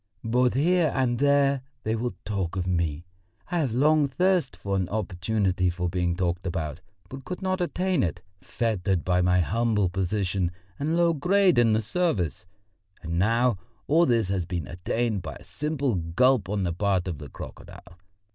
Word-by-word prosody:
Both 125 +2 +2
here 170 +3 +3
and 125 -3 +1
there 140 -1 +3 0.2
they 110 +1 0
will 120 +2 -3
talk 95 -4 -2
of 90 -2 -1
me. 85 -3 -1 0.5
I 175 - +1
have 130 -8 -1
long 150 +2 +4
thirsted 180 0 +1
for 100 -1 -2
an 95 -2 -1
opportunity 95 -2 0
for 90 0 -2
being 90 -1 0
talked 90 0 -1
about, 80 -4 -3 0.3
but 135 0 -9
could 180 +5 -6
not 185 0 0
attain 180 -2 0
it, 90 -1 -1 0.2
fettered 95 -6 -1
by 90 0 +2
my 90 0 +3
humble 105 +3 +1
position 95 -1 -1 0.3
and 155 +4 0
low 170 -1 +4
grade 180 +1 +3
in 115 -2 +4
the 110 +1 +1
service. 100 - -1 0.6
And 85 +1 -2
now 115 +1 +2 0.3
all 165 +4 +4
this 115 -5 +2
has 95 -2 0
been 85 -2 -4
attained 100 - -2
by - - -7
a - - -13
simple 145 -4 -2
gulp 95 +5 +2
on 100 -1 -1
the 85 -2 -1
part 95 0 0
of 85 -6 -4
the 75 -1 -9
crocodile. 90 - -11
105 Hz, 175 wpm, -26 LUFS, 90-135 Hz, 0.6 s, long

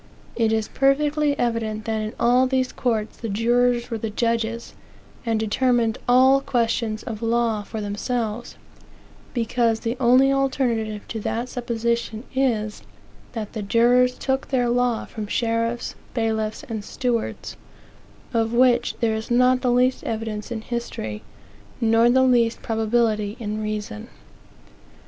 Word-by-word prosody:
It 225 -2 +2
is 220 -1 0
perfectly 290 +1 +2
evident 220 -2 -1
that 220 -1 -1
in 215 +1 -4
all 250 +2 +4
these 260 -1 0
courts 225 -3 -2
the 230 - -5
jurors 240 +3 +1
were 225 - -2
the 225 - -3
judges, 230 +1 -1 0.5
and 225 -1 +1
determined 230 +1 +1
all 260 +2 +6
questions 230 -4 -1
of 220 -2 -6
law 230 -2 +1
for 215 +1 -6
themselves; 220 +2 -3 0.8
because 230 -1 +1
the 230 +1 -2
only 260 +2 +5
alternative 240 -6 -1
to 225 - -4
that 235 +4 -3
supposition 235 -2 -2
is, 225 -6 0 0.5
that 220 -3 -5
the 220 - -4
jurors 245 +4 +3
took 265 0 -1
their 245 -3 +1
law 245 -1 +1
from 215 -2 -6
sheriffs, 230 +1 -1 0.2
bailiffs, 220 -2 -1
and 220 -2 -5
stewards, 240 0 -3 0.8
of 225 0 +1
which 245 -1 +3
there 225 -2 +2
is 220 0 -4
not 250 +1 +4
the 250 -1 +2
least 250 +1 +2
evidence 220 -1 -4
in 225 -2 -3
history, 220 - -5 0.6
nor 225 +1 +4
the 260 +2 +4
least 240 -3 +2
probability 220 -1 0
in 215 -1 -3
reason. 210 - -4
230 Hz, 135 wpm, -23 LUFS, 220-245 Hz, 0.8 s, all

